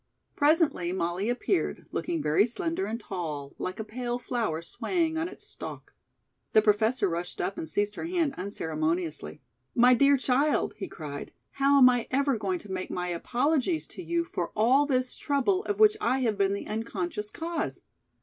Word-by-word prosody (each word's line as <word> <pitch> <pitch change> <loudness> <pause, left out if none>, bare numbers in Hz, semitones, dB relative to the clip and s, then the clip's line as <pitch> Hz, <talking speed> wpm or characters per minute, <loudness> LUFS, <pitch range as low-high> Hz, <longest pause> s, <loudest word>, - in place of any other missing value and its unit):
Presently 290 - +3
Molly 180 +3 -1
appeared, 255 +9 -1
looking 335 -3 -2
very 155 +9 +3
slender 330 - -2
and 225 +2 -3
tall, 155 -9 -5
like 185 +3 -4
a - - -2
pale 240 +2 -3
flower 230 -10 -2
swaying 325 - -1
on 320 +1 -1
its 380 - -11
stalk. - - -8 0.6
The 215 - +7
Professor 220 +1 +3
rushed 175 0 -4
up 195 - -1
and 160 - -4
seized 205 +5 +1
her - - -5
hand 335 -4 0
unceremoniously. 160 - -3 0.3
"My 245 +1 +6
dear 280 +3 +5
child!" 275 +3 +1
he 195 - -5
cried, 145 -3 -7 0.2
"how 280 +1 +3
am 260 -2 +9
I 245 -2 +2
ever 275 0 +2
going 195 -4 -1
to 205 - -11
make 185 0 -3
my 180 0 -3
apologies 275 - 0
to - - -7
you 340 -1 0
for 175 - -4
all 255 +7 +4
this 255 -2 +1
trouble 300 +8 +1
of 410 - -2
which 425 -1 +7
I 265 -10 +1
have 225 -4 +1
been 200 0 +2
the 200 - -5
unconscious 210 -2 -3
cause?" 330 +3 -4
235 Hz, 175 wpm, -28 LUFS, 185-285 Hz, 0.6 s, am